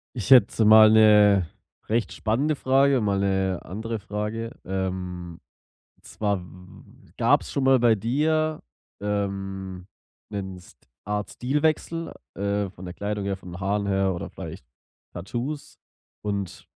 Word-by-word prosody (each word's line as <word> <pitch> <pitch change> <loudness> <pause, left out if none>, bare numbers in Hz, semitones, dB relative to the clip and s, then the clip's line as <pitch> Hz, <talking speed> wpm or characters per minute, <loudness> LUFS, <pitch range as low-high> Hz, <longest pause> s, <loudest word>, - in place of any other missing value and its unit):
Ich 120 +2 -4
hätte 115 -3 +6
mal 110 0 +9
'ne 105 -4 +6 0.4
recht 115 +1 0
spannende 135 +8 0
Frage, 135 -1 +3
mal 100 -2 +1
'ne 95 -2 0
andere 110 +4 -5
Frage. 105 +3 -4
Ähm, 90 -2 -4 0.6
und - - -34
zwar 100 -3 -1
w 90 - -12 0.4
w - - -21
w - - -24
gab's - - +2
schon 140 - -1
mal 135 0 +5
bei 120 -2 +4
dir, 155 +8 0 0.4
ähm, 95 -2 -4 0.4
'nen 95 -3 -5
St 90 - -17 0.3
Art 105 0 -3
Stilwechsel, 155 +5 -1 0.2
äh, 100 0 -1
von 90 0 -12
der 90 -1 -7
Kleidung 105 0 -3
her, 100 -1 -2
von 90 -1 -12
den 90 - -8
Haaren 100 +1 -1
her 95 -1 +1
oder 85 - -5
vielleicht - - -9 0.5
Tattoos, 120 - -5 0.4
und 100 -3 -4
105 Hz, 145 wpm, -25 LUFS, 95-115 Hz, 0.6 s, mal